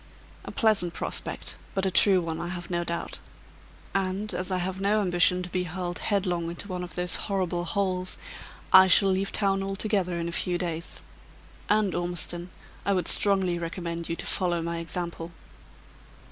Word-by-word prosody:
"A - - -6
pleasant 205 -6 +3
prospect; - - -2 0.2
but 195 0 +1
a 190 - +1
true 185 +1 +5
one, 165 -1 -4
I 175 - -3
have 175 0 -6
no 175 0 0
doubt. 170 0 -4 0.7
And, 195 +2 -1
as 185 +1 -2
I 185 - +2
have 185 +1 -3
no 205 +2 +3
ambition 180 -1 +3
to 180 - -6
be 180 +1 -1
hurled 175 +1 -4
headlong 180 -5 0
into 175 +4 -6
one 180 -2 -4
of 175 - -6
those 180 0 +3
horrible 185 -3 -1
holes, 185 -1 0 0.6
I 190 0 +10
shall 195 +2 +6
leave 195 +1 0
town 195 -2 +2
altogether 195 -2 0
in 170 - -2
a - - -3
few 175 +1 0
days. 170 -1 -4 0.7
And, 210 -3 +3
Ormiston, 175 0 -2 0.3
I 200 - +2
would 185 -2 0
strongly 190 -4 +3
recommend 170 0 -4
you 165 - -1
to - - -4
follow 175 -3 0
my 170 0 -3
example." 170 0 -5
180 Hz, 175 wpm, -27 LUFS, 175-195 Hz, 0.7 s, I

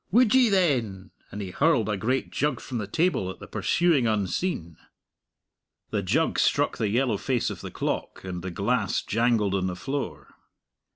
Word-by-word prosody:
"Would 230 +2 +4
ye, 255 -3 +5
then?" 125 - +1 0.2
and 105 0 -6
he 95 - -6
hurled 140 - +2
a 105 - 0
great 125 +7 -1
jug 145 -4 0
from 125 -3 -5
the 105 - -4
table 160 - +1
at 95 - -7
the - - -10
pursuing 165 -9 +2
unseen. 100 - -1 1.1
The - - 0
jug - - +1
struck - - +2
the 110 - +1
yellow 120 0 +1
face 125 +2 -1
of - - -7
the - - -6
clock, - - -3
and 90 -2 -5
the 95 - -4
glass 105 +8 0
jangled 115 -3 +1
on 95 -1 0
the 90 - -3
floor. 90 - -5
115 Hz, 175 wpm, -26 LUFS, 95-145 Hz, 1.1 s, ye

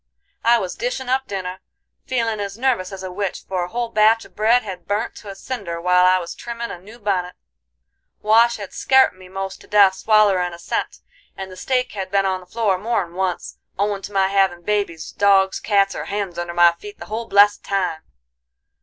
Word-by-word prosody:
I 235 +1 +5
was 185 -5 -3
dishin' 250 +1 -4
up 265 +1 0
dinner, 190 -2 -5 0.5
feelin' 230 -4 -1
as 200 0 -5
nervous 235 -7 0
as 190 -1 -8
a 185 - -5
witch, 195 0 -4
for 185 -2 -1
a - - -4
whole 235 +5 -3
batch 220 +1 +3
of - - -19
bread 230 +4 +3
had 185 -4 -8
burnt 210 +3 -1
to 205 - -10
a 195 - -7
cinder 195 -7 -5
while 180 +1 +4
I 185 0 +5
was 175 -2 -5
trimmin' 235 0 -6
a - - -8
new 215 +5 -13
bunnet, 190 -5 -2 0.9
Wash 230 +2 +4
had 200 -2 -8
scart 265 -6 +4
me 185 0 -15
most 195 0 -6
to - - -16
death 200 -2 +5
swallerin' 195 -4 +3
a - - -12
cent, 170 - -4 0.4
and 190 -1 -7
the - - -10
steak 250 +6 -1
had 195 -3 -5
been 195 0 +2
on 190 -1 0
the 180 - -16
floor 200 -2 0
more'n 205 -5 -2
once, 185 -1 -3 0.2
owin' 200 0 -1
to 205 - -8
my 195 -1 +2
havin' 190 -3 +1
babies, 200 -5 -2
dogs, 195 -1 +3
cats, 200 -2 +2
or - - -5
hens 200 -4 -4
under 175 0 -4
my 175 0 +6
feet 205 +5 -11
the - - -9
whole 225 +2 -5
blessed 205 0 +4
time. 180 -5 -1
195 Hz, 205 wpm, -21 LUFS, 185-220 Hz, 0.9 s, my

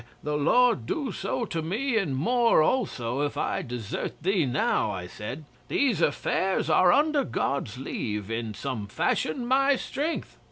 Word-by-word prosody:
The 150 0 -1
Lord 150 - +3
do 285 -5 -2
so 240 - -2
to 165 -5 -3
me 225 - -1
and 185 -11 +1
more 235 - +3
also 140 - 0
if 145 -1 -2
I - - -1
desert 120 +3 -5
thee 185 -5 +2
now," 125 +1 +1
I 90 -2 -4
said. 110 - -7 0.2
"These 240 - +1
affairs 185 +5 +1
are, 180 -1 +6
under 295 - +3
God's 135 - -2
leave, 105 -5 -4
in 115 -2 -3
some 120 -7 -4
fashion 155 - -1
my 270 +3 +4
strength." 300 +5 -4
155 Hz, 155 wpm, -27 LUFS, -, 0.2 s, are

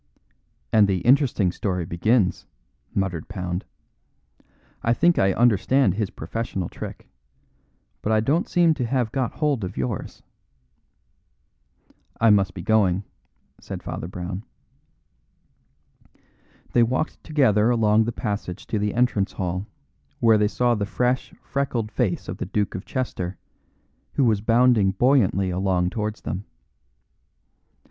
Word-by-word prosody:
"And 105 -2 +6
the 95 -3 0
interesting 125 -8 +3
story 90 -2 -2
begins," 95 +4 +1 0.5
muttered 90 -5 -2
Pound. 90 -3 -4 1.2
"I 115 - +2
think 170 +6 +3
I 95 0 +4
understand 120 +1 +3
his 105 -1 -2
professional 95 +1 -4
trick. - - -8 0.9
But 110 - -1
I 110 - +4
don't 145 +10 +1
seem 170 -2 +4
to 135 -6 -2
have 120 -3 0
got 130 -2 -1
hold 145 -7 0
of 95 +1 -5
yours." 65 -1 -4 2.0
"I 115 -1 +5
must 95 -3 +2
be 90 - -6
going," 100 -4 +2 0.6
said - - -7
Father - - -5
Brown. 90 +2 -6 2.3
They 120 - +5
walked 130 +7 -1
together 120 -8 +3
along 110 -2 +3
the 120 - -1
passage 100 -6 -4
to 110 - -2
the 105 0 -1
entrance 120 -5 +1
hall, 90 +2 -3 0.5
where 115 -2 +5
they 105 - +3
saw 120 +3 +1
the 105 -3 -2
fresh, 125 +4 0
freckled 125 -6 -2
face - - -1
of - - -5
the - - -3
Duke 105 -1 -1
of 95 - -6
Chester, 95 -8 -3 0.8
who 140 - +2
was 110 -4 +2
bounding 115 -3 +4
buoyantly 100 -5 +2
along 90 -1 0
towards 105 -1 -3
them. 90 +7 -4
105 Hz, 130 wpm, -24 LUFS, 95-120 Hz, 2.3 s, And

